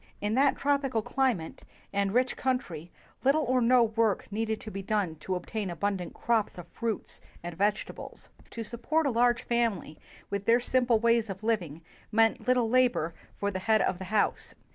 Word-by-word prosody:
In 205 Hz, +1 st, -1 dB
that 270 Hz, +3 st, +3 dB
tropical 275 Hz, -5 st, 0 dB
cli 265 Hz, +2 st, +2 dB
mate 160 Hz, -3 st, -9 dB, 0.3 s
and 200 Hz, -1 st, +1 dB
rich 250 Hz, +3 st, +1 dB
country, 185 Hz, -, -2 dB, 0.3 s
little 280 Hz, +4 st, +3 dB
or 255 Hz, -1 st, +2 dB
no 245 Hz, +1 st, +5 dB
work 220 Hz, -2 st, +1 dB
needed 220 Hz, +1 st, -1 dB
to 215 Hz, -, -8 dB
be 195 Hz, -, -5 dB
done 195 Hz, -4 st, -1 dB
to 185 Hz, +5 st, -3 dB
obtain 195 Hz, +3 st, -4 dB
abundant 185 Hz, +1 st, -3 dB
crops 225 Hz, -5 st, 0 dB
of 175 Hz, -1 st, -9 dB
fruits 230 Hz, -3 st, -4 dB, 0.2 s
and 175 Hz, -1 st, -6 dB
vegetables. 205 Hz, +3 st, -2 dB, 0.2 s
To 230 Hz, -, -5 dB
support 245 Hz, +8 st, -1 dB
a 280 Hz, -, +2 dB
large 240 Hz, 0 st, +2 dB
family 230 Hz, -10 st, -1 dB, 0.3 s
with 200 Hz, 0 st, -2 dB
their 230 Hz, +3 st, +5 dB
simple 245 Hz, -1 st, +2 dB
ways 230 Hz, 0 st, +2 dB
of 195 Hz, +2 st, -6 dB
liv 225 Hz, -2 st, +2 dB
ing 160 Hz, -1 st, -9 dB, 0.3 s
meant 225 Hz, +2 st, +2 dB
little 250 Hz, -2 st, +3 dB
labor 240 Hz, -9 st, +2 dB, 0.2 s
for 200 Hz, 0 st, -1 dB
the 185 Hz, -, -3 dB
head 220 Hz, +3 st, +3 dB
of 180 Hz, -, -1 dB
the 190 Hz, -, -6 dB
house. 205 Hz, +2 st, 0 dB
220 Hz, 185 wpm, -29 LUFS, 195-245 Hz, 0.3 s, no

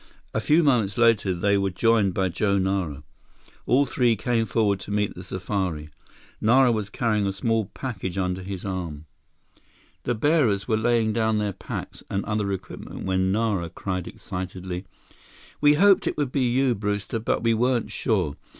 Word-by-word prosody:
A -, -, +1 dB
few 155 Hz, +3 st, +4 dB
moments 120 Hz, -9 st, +2 dB
later 115 Hz, -5 st, +4 dB
they 100 Hz, +3 st, +2 dB
were 100 Hz, 0 st, +1 dB
joined 105 Hz, -1 st, +2 dB
by 95 Hz, -1 st, +1 dB
Joe 100 Hz, +3 st, +1 dB
Nara. 95 Hz, -7 st, -1 dB, 0.6 s
All 135 Hz, +3 st, +4 dB
three 120 Hz, -4 st, +2 dB
came 115 Hz, +1 st, 0 dB
forward 100 Hz, -1 st, +1 dB
to -, -, -10 dB
meet 105 Hz, 0 st, 0 dB
the 90 Hz, -, -9 dB
safari. 90 Hz, -5 st, -3 dB, 0.5 s
Nara 125 Hz, +3 st, +5 dB
was 105 Hz, -3 st, -2 dB
carrying 105 Hz, -2 st, 0 dB
a -, -, 0 dB
small 110 Hz, +2 st, 0 dB
package 95 Hz, -8 st, -4 dB
under 90 Hz, -1 st, -1 dB
his 95 Hz, 0 st, -6 dB
arm. 85 Hz, -6 st, -4 dB, 1.0 s
The 120 Hz, -, -1 dB
bearers 115 Hz, -6 st, +2 dB
were 110 Hz, -, +2 dB
laying 110 Hz, 0 st, +2 dB
down 110 Hz, -1 st, +1 dB
their 105 Hz, -1 st, -1 dB
packs -, -, -7 dB
and 100 Hz, -, -2 dB
other 105 Hz, -1 st, -1 dB
equipment 95 Hz, -, -7 dB
when 95 Hz, 0 st, +1 dB
Nara 100 Hz, -5 st, 0 dB
cried 90 Hz, +1 st, -4 dB
excitedly: 90 Hz, 0 st, -6 dB, 0.8 s
"We 145 Hz, 0 st, +6 dB
hoped 195 Hz, +4 st, +5 dB
it -, -, -1 dB
would 145 Hz, -4 st, -1 dB
be 130 Hz, -3 st, +1 dB
you, 130 Hz, +1 st, +2 dB
Brewster, 105 Hz, +1 st, -2 dB
but 110 Hz, -, -1 dB
we 115 Hz, -1 st, +3 dB
weren't 120 Hz, +1 st, +1 dB
sure. 90 Hz, -, 0 dB
105 Hz, 170 wpm, -25 LUFS, 95-115 Hz, 1.0 s, We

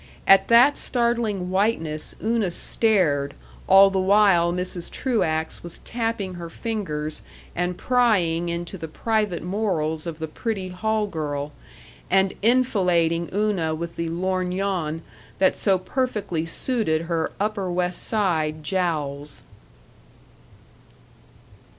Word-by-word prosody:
At 195 Hz, 0 st, +6 dB
that 245 Hz, +5 st, +6 dB
startling 235 Hz, -7 st, -1 dB
whiteness 185 Hz, -6 st, 0 dB
Una 220 Hz, -3 st, +1 dB
stared 170 Hz, -8 st, +2 dB, 0.3 s
all 195 Hz, +1 st, +7 dB
the 190 Hz, -, 0 dB
while 190 Hz, -3 st, +4 dB
Mrs. 180 Hz, -1 st, -3 dB
Truax 170 Hz, -11 st, -1 dB
was 170 Hz, 0 st, -8 dB
tapping 225 Hz, -5 st, -2 dB
her 170 Hz, -1 st, -7 dB
fingers 155 Hz, -7 st, -3 dB, 0.3 s
and 175 Hz, +1 st, -1 dB
prying 185 Hz, -10 st, +2 dB
into 170 Hz, +2 st, -5 dB
the 160 Hz, -, -5 dB
private 210 Hz, 0 st, -1 dB
morals 175 Hz, -5 st, -1 dB
of 165 Hz, -2 st, -5 dB
the 160 Hz, 0 st, -4 dB
pretty 195 Hz, +3 st, -4 dB
hall 215 Hz, +4 st, -1 dB
girl, 150 Hz, -5 st, -4 dB, 0.6 s
and 190 Hz, +1 st, +3 dB
enfilading 180 Hz, -8 st, +2 dB
Una 195 Hz, -6 st, 0 dB
with 170 Hz, +1 st, -6 dB
the 170 Hz, -, -3 dB
lorgnon 180 Hz, -2 st, -2 dB, 0.3 s
that 190 Hz, -, +3 dB
so 195 Hz, -2 st, +2 dB
perfectly 190 Hz, -6 st, -2 dB
suited 165 Hz, -6 st, 0 dB
her 165 Hz, -1 st, -1 dB
Upper 200 Hz, -3 st, -1 dB
West 180 Hz, 0 st, -1 dB
Side 160 Hz, -8 st, 0 dB
jowls. 150 Hz, -, -2 dB
180 Hz, 115 wpm, -23 LUFS, 165-210 Hz, 0.6 s, all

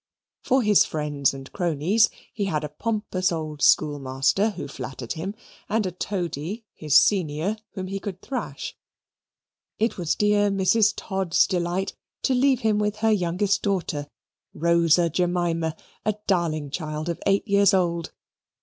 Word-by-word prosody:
For 260 Hz, 0 st, +2 dB
his 210 Hz, -2 st, +5 dB
friends 150 Hz, -3 st, 0 dB
and 135 Hz, -1 st, -10 dB
cronies, 180 Hz, +5 st, +2 dB, 0.2 s
he 205 Hz, -3 st, -2 dB
had 155 Hz, -6 st, -1 dB
a 150 Hz, -, -4 dB
pompous 190 Hz, +1 st, -1 dB
old 155 Hz, -3 st, -4 dB
schoolmaster, 145 Hz, +7 st, +2 dB
who 195 Hz, -8 st, -6 dB
flattered 130 Hz, -3 st, -6 dB
him, 180 Hz, +5 st, -5 dB, 0.3 s
and 215 Hz, 0 st, +1 dB
a 185 Hz, -, -2 dB
toady, 180 Hz, -, -4 dB
his 150 Hz, -2 st, +3 dB
senior, 180 Hz, 0 st, +1 dB, 0.2 s
whom 190 Hz, -3 st, -4 dB
he 195 Hz, +1 st, -4 dB
could 190 Hz, -2 st, -6 dB
thrash. 265 Hz, +4 st, -5 dB, 1.0 s
It 225 Hz, -2 st, 0 dB
was 170 Hz, -3 st, 0 dB
dear 205 Hz, 0 st, +3 dB
Mrs. 200 Hz, +2 st, +3 dB
Todd's 190 Hz, -4 st, +1 dB
delight 180 Hz, +1 st, -1 dB, 0.3 s
to 265 Hz, -, +2 dB
leave 260 Hz, 0 st, +3 dB
him 215 Hz, -2 st, +2 dB
with 210 Hz, 0 st, 0 dB
her 220 Hz, -, +5 dB
youngest 190 Hz, 0 st, +1 dB
daughter, 170 Hz, -7 st, -1 dB, 0.5 s
Rosa 170 Hz, +1 st, +3 dB
Jemima, 170 Hz, -1 st, 0 dB, 0.3 s
a 215 Hz, -1 st, 0 dB
darling 160 Hz, -6 st, 0 dB
child 155 Hz, 0 st, -4 dB
of 170 Hz, -, -3 dB
eight 200 Hz, +2 st, +2 dB
years 200 Hz, -1 st, +5 dB
old. 170 Hz, -4 st, 0 dB
180 Hz, 145 wpm, -24 LUFS, 155-205 Hz, 1.0 s, his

